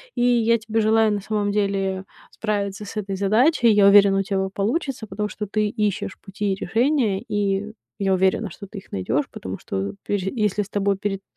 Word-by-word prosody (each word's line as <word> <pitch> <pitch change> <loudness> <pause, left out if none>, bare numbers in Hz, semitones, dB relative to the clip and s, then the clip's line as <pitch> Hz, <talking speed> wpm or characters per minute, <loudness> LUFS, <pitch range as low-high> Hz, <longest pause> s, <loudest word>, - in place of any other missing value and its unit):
И - - -1
я 235 -1 +4
тебе 225 0 -1
желаю, 220 0 +3
на 205 - -2
самом 210 -1 -1
деле, 195 -2 -1 0.3
справиться 205 -1 -3
с - - -9
этой 195 -2 -3
задачей. 235 - +3
Я 205 -1 +5
уверена, 200 -1 +6
у 195 - +1
тебя 195 0 -1
о - - -4
получится, 230 - -2
потому 210 +2 -3
что 210 +1 -5
ты 215 +1 0
ищешь 210 -3 -2
пути 200 0 -2
и - - -2
решения, 225 - +1
и 205 +1 -1 0.3
я 195 -1 +2
уверена, 190 0 +1
что 200 - -10
ты 200 +2 -11
их 195 - -11
найдешь, 110 +10 0
потому 95 +1 -7
что, 95 +1 -4
пепе 195 -2 -1
если 210 -3 0
с 195 - -14
тобой 200 -1 0
перед 195 -1 -3
205 Hz, 200 wpm, -23 LUFS, 195-215 Hz, 0.3 s, уверена